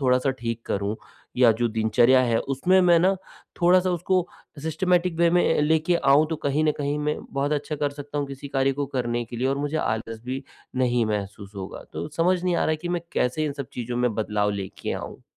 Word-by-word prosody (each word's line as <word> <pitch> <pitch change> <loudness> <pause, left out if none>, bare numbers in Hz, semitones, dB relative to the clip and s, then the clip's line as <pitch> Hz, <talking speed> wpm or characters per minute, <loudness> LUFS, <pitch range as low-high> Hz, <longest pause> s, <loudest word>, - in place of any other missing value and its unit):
थोड़ा-सा 130 0 +2
ठीक 115 -1 -3
करूँ 100 +2 -1 0.4
या 125 -2 +6
जो 120 - +3
दिनचर्या 115 +3 +4
है 120 -2 +2
उसमें 155 +8 +2
मैं 175 -2 +5
ना 185 +3 +3 0.5
थोड़ा-सा 180 +1 +4
उसको 180 +1 +1 0.4
सिस्टमैटिक 180 +2 +1
वे 170 0 +4
में 175 +1 +3
अ, - - +4
लेके 160 +3 +2
आऊँ 145 0 +4
तो 160 - -1
कहीं 145 +3 +1
न 155 - +3
कहीं 145 0 -1
मैं 150 0 -1
बहुत 140 +2 -1
अच्छा 150 +1 -2
कर 145 0 0
सकता 145 +1 -6
हूँ 145 - -1
किसी 140 +1 -8
कार्य 135 0 +1
को 140 +1 -2
करने 120 -1 -1
के 120 +1 -9
लिए 125 +3 0
और 135 +1 0
मुझे 145 +2 -2
आलस 110 -5 -2
भी, 130 +2 -4 0.3
नहीं 125 -2 +2
महसूस 100 -1 -4
होगा। 95 -1 -7
तो - - -4
समझ 180 +2 +2
नहीं 180 -1 +1
आ - - 0
रहा - - +1
है 155 - +1
कि 170 +3 -6
मैं 175 -1 -1
कैसे 125 +5 0
इन 150 - -1
सब 140 -2 -6
चीज़ों 120 0 -4
में 125 -2 +1
बदलाव 105 -1 0
लेके 100 -2 -4
आऊँ? - - -7
140 Hz, 225 wpm, -25 LUFS, 120-160 Hz, 0.5 s, या